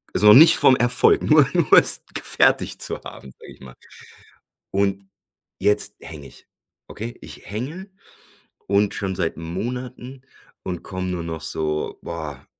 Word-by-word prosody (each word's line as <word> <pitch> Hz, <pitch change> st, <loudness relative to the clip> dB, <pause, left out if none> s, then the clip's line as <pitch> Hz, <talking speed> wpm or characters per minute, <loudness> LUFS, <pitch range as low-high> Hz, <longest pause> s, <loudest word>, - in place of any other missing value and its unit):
also, 105 Hz, 0 st, +6 dB
nicht 160 Hz, +7 st, +8 dB
vom 130 Hz, -, +5 dB
Erfolg 120 Hz, +1 st, +3 dB
nur 150 Hz, -3 st, +5 dB
nur 170 Hz, -5 st, 0 dB
es -, -, -1 dB
gefertigt -, -, +1 dB
zu -, -, -4 dB
haben, 65 Hz, -, -12 dB
sage -, -, -13 dB
ich -, -, -22 dB
mal. 65 Hz, -1 st, -12 dB, 1.0 s
Und 100 Hz, 0 st, -1 dB, 0.5 s
jetzt 105 Hz, +2 st, 0 dB
hänge 75 Hz, -4 st, -10 dB
ich. 65 Hz, -, -18 dB, 0.4 s
Okay, 115 Hz, +3 st, -8 dB
ich -, -, -12 dB
hänge 145 Hz, -, -6 dB, 0.8 s
und 100 Hz, +1 st, +1 dB
schon 95 Hz, -3 st, -3 dB
seit 85 Hz, -3 st, -2 dB
Monaten 125 Hz, +9 st, -7 dB, 0.4 s
und 90 Hz, -2 st, -6 dB
komme 95 Hz, -1 st, -5 dB
nur 90 Hz, -2 st, -4 dB
noch 80 Hz, -1 st, -6 dB
so, 75 Hz, -1 st, -3 dB
boah, 80 Hz, -6 st, -7 dB
100 Hz, 145 wpm, -21 LUFS, 85-125 Hz, 1.0 s, nicht